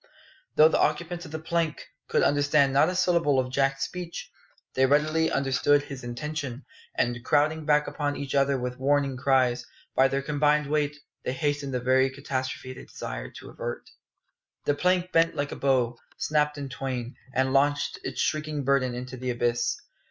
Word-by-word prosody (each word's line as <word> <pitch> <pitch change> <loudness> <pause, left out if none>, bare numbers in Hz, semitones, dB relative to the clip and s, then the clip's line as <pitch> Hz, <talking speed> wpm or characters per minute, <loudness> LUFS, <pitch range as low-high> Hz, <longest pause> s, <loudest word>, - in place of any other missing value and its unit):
Though 155 - +8
the - - +1
occupants 170 +3 0
of 160 - -10
the 160 - -3
plank 160 0 -2 0.2
could - - +2
understand 145 -1 +3
not 145 +5 +5
a 185 - -3
syllable 170 -6 +3
of 130 -1 0
Jack's 135 0 +1
speech, 175 -2 -7 0.4
they 130 0 +3
readily 155 +3 +2
understood 140 +1 +2
his 135 -3 -8
intention; 140 +1 -5 0.3
and 120 0 0
crowding 155 +4 +2
back 150 0 +4
upon 145 -1 -2
each 140 -2 -5
other 140 0 +3
with 125 0 -4
warning 140 0 +2
cries, 130 -2 +2 0.3
by 135 - +5
their 135 +1 -1
combined 150 +1 +2
weight 150 0 0 0.3
they 125 - -2
hastened 145 -1 -1
the - - +1
very 130 +2 +3
catastrophe 130 -1 -4
they - - -11
desired - - -7
to - - -10
avert. - - -6 0.7
The 145 - +3
plank 180 +4 +1
bent 165 0 +3
like 145 0 -2
a - - -4
bow, 125 -3 +1 0.2
snapped 150 -1 +1
in 140 -1 -4
twain, 125 -2 -4 0.2
and 130 0 +2
launched 145 +1 +2
its - - -5
shrieking 155 -2 -1
burden 130 -2 +2
into 125 +1 -6
the 130 +1 -4
abyss. 120 0 0
140 Hz, 175 wpm, -27 LUFS, 130-150 Hz, 0.7 s, Though